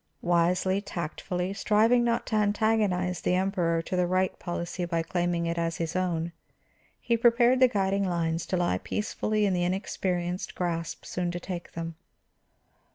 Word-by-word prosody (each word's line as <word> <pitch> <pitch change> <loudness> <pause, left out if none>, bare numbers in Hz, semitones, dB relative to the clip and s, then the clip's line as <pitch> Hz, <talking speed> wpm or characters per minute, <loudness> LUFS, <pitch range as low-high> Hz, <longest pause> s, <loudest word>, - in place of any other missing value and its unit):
Wisely, 180 +3 +2
tactfully, 180 0 -3
striving 220 +4 +3
not 235 0 +1
to 220 - -2
antagonize 205 -4 +1
the 180 - +1
Emperor 180 -3 +1
to 185 - -3
the 180 -1 +2
right 185 +1 0
policy 175 0 -4
by 170 -1 -1
claiming 175 0 -1
it 170 0 -1
as 165 0 -1
his 165 0 -3
own, 170 -2 -1 0.7
he 235 - +1
prepared 240 +2 +4
the 255 - +7
guiding 195 -3 0
lines 165 -1 -1
to 185 - 0
lie 175 - +1
peacefully 215 - -1
in 195 - +2
the 175 -1 +1
inexperienced 180 -1 -2
grasp 170 -2 -3
soon 180 -1 -2
to 175 0 -3
take 175 -1 -6
them. 165 0 -4
180 Hz, 160 wpm, -28 LUFS, 170-200 Hz, 0.7 s, the